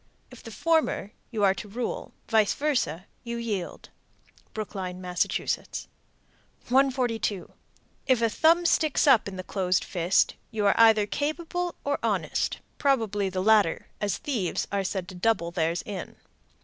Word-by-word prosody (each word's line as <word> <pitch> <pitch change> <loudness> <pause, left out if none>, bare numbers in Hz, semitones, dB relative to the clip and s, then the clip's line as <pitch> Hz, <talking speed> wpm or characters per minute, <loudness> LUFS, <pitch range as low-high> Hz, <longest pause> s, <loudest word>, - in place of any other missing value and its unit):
If - - -12
the - - -10
former, 320 -10 0 0.2
you 220 -4 -2
are 195 -1 +5
to 210 - -8
rule; 230 +4 -4 0.2
vice 220 -3 +3
versa, 240 - -1 0.2
you 235 0 -4
yield. 210 -7 -4 0.6
Brookline, 190 -4 -5
Mass. 180 -1 0
142. 245 -7 -2 0.5
If 255 -3 +4
the 230 - +3
thumb 330 +9 +3
sticks 315 -3 +2
up 260 -8 +5
in 195 - -6
the 185 - -5
closed 185 -2 0
fist, 180 +1 +2 0.2
you 215 -3 -2
are 200 - +5
either 220 -2 +6
capable 340 - -2
or 285 0 -1
honest, - - -1 0.2
probably 220 -8 +1
the 185 0 -2
latter, 210 -5 +3
as 205 -1 0
thieves 235 - -2
are 200 -1 0
said 190 -1 -3
to - - -9
double 180 -2 0
theirs 170 -1 -1
in. 200 -3 -6
215 Hz, 145 wpm, -27 LUFS, 190-255 Hz, 0.6 s, either